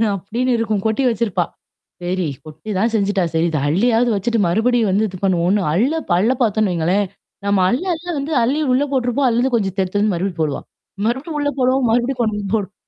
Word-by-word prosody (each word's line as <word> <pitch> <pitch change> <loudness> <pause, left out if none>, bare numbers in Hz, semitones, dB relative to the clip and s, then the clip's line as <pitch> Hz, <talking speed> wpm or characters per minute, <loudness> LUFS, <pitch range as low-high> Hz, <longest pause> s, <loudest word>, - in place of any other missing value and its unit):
அப்டின்னு 235 +7 -2
இருக்கும். 215 -3 -1
கொட்டி 220 +5 +1
வச்சிருப்பா. 200 -6 0 0.6
சரி 180 -1 -1 0.2
கொட்டி 155 +7 -10
தான் 225 +4 +1
செஞ்சுட்டா 200 -2 +1
சரி. 165 +1 +2
இது 155 - 0
அள்ளியாவது 230 +8 +2
வச்சுட்டு 225 +3 0
மறுபடியும் 225 +4 +2
வந்து 210 +3 +2
இது 185 -2 -8
பண்ணுவோம்ன்னு 185 +1 +2
அள்ளு 255 - +2 0.2
அள்ள 220 +7 +3
பாரத்தோம்ன்னு 215 -3 +2
வைங்களேன். 180 +5 +1 0.4
நம்ம 200 -1 +2
அள்ள 250 - 0
அள்ள 330 +1 -7
வந்து 280 +3 -3
அள்ளி 275 +6 +1
உள்ள 265 - +3
போட்டுருப்போம். 255 +1 +1
அதுலருந்து 245 +2 +1
கொஞ்சம் 195 -4 -1
தெடுத்து 190 +2 0
வந்து 210 -2 +2
மறுபடிய 175 0 -2
போடுவான். 150 -3 -2 0.4
மறுபடியும் 270 +7 -2
உள்ள 290 0 +1
போடுவோம். 255 0 +2
மறுபடியும் 245 +2 +1
கொண்டு 215 -2 0
போடும். 205 -3 -1
215 Hz, 180 wpm, -19 LUFS, 190-245 Hz, 0.6 s, அள்ள